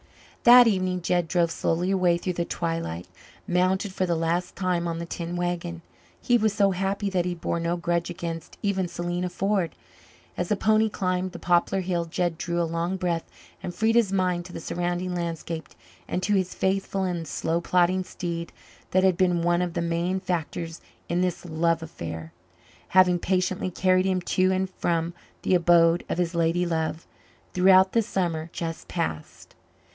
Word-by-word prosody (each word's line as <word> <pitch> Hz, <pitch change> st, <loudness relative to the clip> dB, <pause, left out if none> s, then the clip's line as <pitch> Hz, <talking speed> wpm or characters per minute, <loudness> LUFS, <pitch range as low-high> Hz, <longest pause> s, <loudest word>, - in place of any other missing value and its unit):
That 245 Hz, +1 st, +10 dB
evening 185 Hz, -4 st, 0 dB
Jed 175 Hz, -1 st, +1 dB
drove 170 Hz, 0 st, +1 dB
slowly 175 Hz, +3 st, 0 dB
away 180 Hz, -3 st, +3 dB
through 180 Hz, +1 st, -3 dB
the 170 Hz, 0 st, -2 dB
twilight, 165 Hz, -, -3 dB, 0.4 s
mounted 185 Hz, +2 st, +1 dB
for 185 Hz, -1 st, 0 dB
the 170 Hz, -, +1 dB
last 165 Hz, +2 st, -1 dB
time 180 Hz, -2 st, 0 dB
on 165 Hz, -1 st, -2 dB
the 170 Hz, -, -4 dB
tin 170 Hz, +1 st, -5 dB
wagon. 175 Hz, -1 st, -3 dB, 0.4 s
He 245 Hz, -1 st, +3 dB
was 215 Hz, -1 st, +2 dB
so 200 Hz, -1 st, +3 dB
happy 195 Hz, +2 st, -1 dB
that 180 Hz, -2 st, +1 dB
he 180 Hz, -1 st, -2 dB
bore 170 Hz, 0 st, -2 dB
no 170 Hz, +1 st, -1 dB
grudge 170 Hz, 0 st, -1 dB
against 170 Hz, -1 st, -6 dB
even 190 Hz, -3 st, 0 dB
Selena 175 Hz, +1 st, -3 dB
Ford. 190 Hz, -2 st, -1 dB, 0.6 s
As 175 Hz, -, -2 dB
the 210 Hz, -, +3 dB
pony 215 Hz, +2 st, +3 dB
climbed 185 Hz, -2 st, -1 dB
the -, -, -6 dB
poplar 175 Hz, +2 st, +2 dB
hill 175 Hz, -2 st, -1 dB
Jed 170 Hz, 0 st, -2 dB
drew 170 Hz, 0 st, -1 dB
a -, -, +2 dB
long 170 Hz, +3 st, -2 dB
breath 175 Hz, -2 st, -2 dB, 0.3 s
and 175 Hz, -, -6 dB
freed 220 Hz, +1 st, +2 dB
his 230 Hz, -4 st, +3 dB
mind 180 Hz, -2 st, 0 dB
to 180 Hz, -, -11 dB
the -, -, -5 dB
surrounding 175 Hz, +2 st, -2 dB
landscape 165 Hz, -1 st, -4 dB, 0.4 s
and 185 Hz, -, -2 dB
to 210 Hz, -, +1 dB
his 185 Hz, -2 st, 0 dB
faithful 195 Hz, 0 st, 0 dB
and 175 Hz, -3 st, -2 dB
slow 165 Hz, +3 st, -1 dB
plodding 180 Hz, +1 st, +2 dB
steed 170 Hz, -2 st, -5 dB, 0.4 s
that 185 Hz, 0 st, +3 dB
had 185 Hz, -2 st, +3 dB
been 180 Hz, -2 st, +2 dB
one 175 Hz, +1 st, +2 dB
of 175 Hz, -2 st, -2 dB
the -, -, 0 dB
main 170 Hz, +3 st, 0 dB
factors 170 Hz, -2 st, -3 dB, 0.3 s
in 175 Hz, +1 st, +1 dB
this 180 Hz, -1 st, -1 dB
love 165 Hz, 0 st, 0 dB
affair, 80 Hz, -, -7 dB, 0.5 s
having 180 Hz, -1 st, +5 dB
patiently 185 Hz, +1 st, 0 dB
carried 185 Hz, +1 st, +2 dB
him 185 Hz, -1 st, +1 dB
to 185 Hz, +1 st, +1 dB
and 190 Hz, 0 st, 0 dB
from 170 Hz, -2 st, -1 dB, 0.3 s
the -, -, +1 dB
abode 170 Hz, -1 st, +5 dB
of -, -, -1 dB
his 175 Hz, -1 st, 0 dB
lady 170 Hz, +1 st, +1 dB
love 160 Hz, -1 st, -2 dB, 0.5 s
throughout 190 Hz, +1 st, +6 dB
the 230 Hz, -, +3 dB
summer 170 Hz, -7 st, -2 dB
just 165 Hz, -1 st, -5 dB
passed. 160 Hz, -, -4 dB
175 Hz, 180 wpm, -26 LUFS, 170-185 Hz, 0.6 s, That